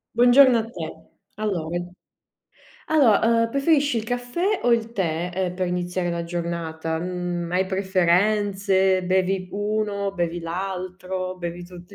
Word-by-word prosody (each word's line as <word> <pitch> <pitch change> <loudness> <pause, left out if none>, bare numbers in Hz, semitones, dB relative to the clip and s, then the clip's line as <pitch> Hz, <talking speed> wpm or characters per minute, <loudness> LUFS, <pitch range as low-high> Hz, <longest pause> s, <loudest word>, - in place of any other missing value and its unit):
Buongiorno 245 +1 +7
a - - -1
te. - - -8 0.3
Allora. 175 -3 -2 1.0
Allo 275 -9 +4
ehm, 230 0 +3
preferisci 280 -1 +2
il - - -3
caffè 245 - -1
o 245 - +4
il 230 -1 +1
tè, 175 -4 -1
ehm, 180 0 -2
per 185 -1 -1
iniziare 180 0 -2
la 170 0 -3
giornata? 170 -2 -3
Mhmm, 175 0 -3
hai 185 +1 +1
preferenze? 190 0 +2
Bevi 185 0 +1
uno, 205 -1 -1
bevi 175 -2 -2
l'altro, 185 +1 -4
bevi 175 0 -6
tutti 180 +2 -13
185 Hz, 130 wpm, -23 LUFS, 175-215 Hz, 1.0 s, Buongiorno